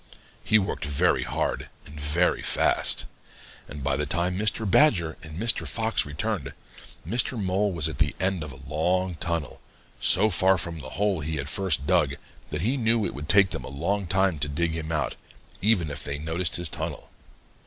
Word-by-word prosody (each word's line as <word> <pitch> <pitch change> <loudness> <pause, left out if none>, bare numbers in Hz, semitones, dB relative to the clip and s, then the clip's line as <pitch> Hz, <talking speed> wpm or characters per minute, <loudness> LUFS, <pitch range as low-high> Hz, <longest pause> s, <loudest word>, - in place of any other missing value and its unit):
He 110 - +4
worked 100 -2 -2
very 75 -1 +2
hard - - -2 0.2
and 75 +1 -10
very 75 +5 +1
fast, - - +2 0.6
and 75 -2 -8
by - - +1
the 75 -1 -2
time 85 +3 0
Mr. 110 +2 0
Badger 90 - +3
and 80 0 -9
Mr. 115 +2 +1
Fox 110 -8 +1
returned, 75 -1 -3 0.5
Mr. 120 +3 0
Mole 100 +1 0
was 85 -5 +1
at 65 - -6
the 75 -1 +1
end 95 -2 0
of 75 - -7
a 70 0 -13
long 90 +5 0
tunnel, 85 -2 -4 0.4
so 105 +4 +6
far 95 +1 +4
from 85 -1 -3
the 65 -3 -8
hole 100 -3 +1
he 80 +1 -3
had 70 -2 -3
first 90 -8 -1
dug - - +2 0.3
that 75 0 -3
he 120 +9 0
knew 115 -3 +2
it - - -3
would 75 +2 -8
take 95 +1 +5
them - - -4
a - - -8
long 90 +8 -2
time 95 -2 +1
to 75 - -1
dig 80 +3 0
him 80 0 -4
out, 75 -2 -1 0.4
even 95 -7 +2
if 75 +2 -5
they 70 0 -3
noticed 80 +2 -2
his 85 -1 -1
tunnel. - - -5
85 Hz, 190 wpm, -26 LUFS, 75-100 Hz, 0.6 s, so